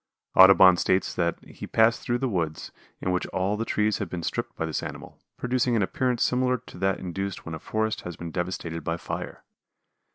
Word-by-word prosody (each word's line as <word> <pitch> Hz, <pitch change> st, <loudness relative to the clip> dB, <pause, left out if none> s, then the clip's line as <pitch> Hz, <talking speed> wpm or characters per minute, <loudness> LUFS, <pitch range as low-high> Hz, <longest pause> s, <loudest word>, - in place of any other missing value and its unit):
Audubon 95 Hz, -1 st, +8 dB
states 95 Hz, +2 st, +1 dB
that 85 Hz, -2 st, 0 dB
he -, -, -9 dB
passed 110 Hz, +1 st, +3 dB
through 120 Hz, -, 0 dB
woods, 90 Hz, -, -2 dB, 0.3 s
in 90 Hz, -, -1 dB
which 90 Hz, -, -1 dB
all 95 Hz, +3 st, -1 dB
the 110 Hz, -, -2 dB
trees 105 Hz, -1 st, +1 dB
had 100 Hz, -, -3 dB
been 85 Hz, -1 st, -5 dB
stripped -, -, -3 dB
by 80 Hz, -, -2 dB
this 80 Hz, -, -2 dB
animal, -, -, -8 dB, 0.2 s
producing 125 Hz, -1 st, +1 dB
an 105 Hz, -, +2 dB
appearance 125 Hz, +4 st, 0 dB
similar 125 Hz, 0 st, +2 dB
to 115 Hz, -6 st, -14 dB
that 95 Hz, 0 st, +1 dB
induced 95 Hz, +2 st, -5 dB
when 80 Hz, -, -6 dB
a 80 Hz, -, -5 dB
forest 110 Hz, +4 st, -2 dB
has 90 Hz, -2 st, -7 dB
been 85 Hz, -1 st, -6 dB
devastated 85 Hz, -2 st, -4 dB
by 85 Hz, +2 st, -2 dB
fire. -, -, -6 dB
95 Hz, 195 wpm, -26 LUFS, 85-110 Hz, 0.3 s, Audubon